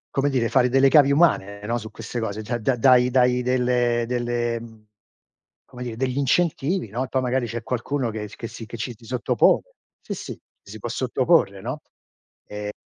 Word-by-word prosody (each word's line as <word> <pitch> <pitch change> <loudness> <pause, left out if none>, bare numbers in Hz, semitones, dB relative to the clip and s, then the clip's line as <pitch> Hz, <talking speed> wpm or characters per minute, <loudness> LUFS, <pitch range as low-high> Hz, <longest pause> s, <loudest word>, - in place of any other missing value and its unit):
Come 140 +1 +2
dire, 125 -4 +1
fare 125 +1 +3
delle 135 +2 +4
cavie 140 0 +6
umane, 140 - +2
no, 120 +3 -1
su 110 -2 -8
queste 115 +1 -6
cose. 110 -1 -3
Da 120 +2 -3
da 120 +3 0
dai 125 +1 +5
dai 125 -1 +3
delle 125 -1 +1
delle 120 -1 -1
mhmm, 110 -2 -14 0.8
come 125 0 -9
dire, 115 -2 -6
degli 130 0 -1
incentivi, 160 +3 +1
no, 120 +6 -2
e 130 - -6
poi 130 - 0
magari, 125 -1 0
c'è 115 +1 -5
qualcuno 125 +1 -2
che 105 -1 -6
che 115 - -7
si 115 - -9
che 115 - -9
ci 120 +1 -5
si 115 - -22
sottopone. 125 -1 +2 0.4
Sì, - - -5
sì. - - -7
Ci 100 - -19
si 110 - -9
può 115 - -5
sottoporre, 125 - +1
no, 130 +8 -5 0.7
ehm 105 0 -5
120 Hz, 195 wpm, -23 LUFS, 115-130 Hz, 0.8 s, cavie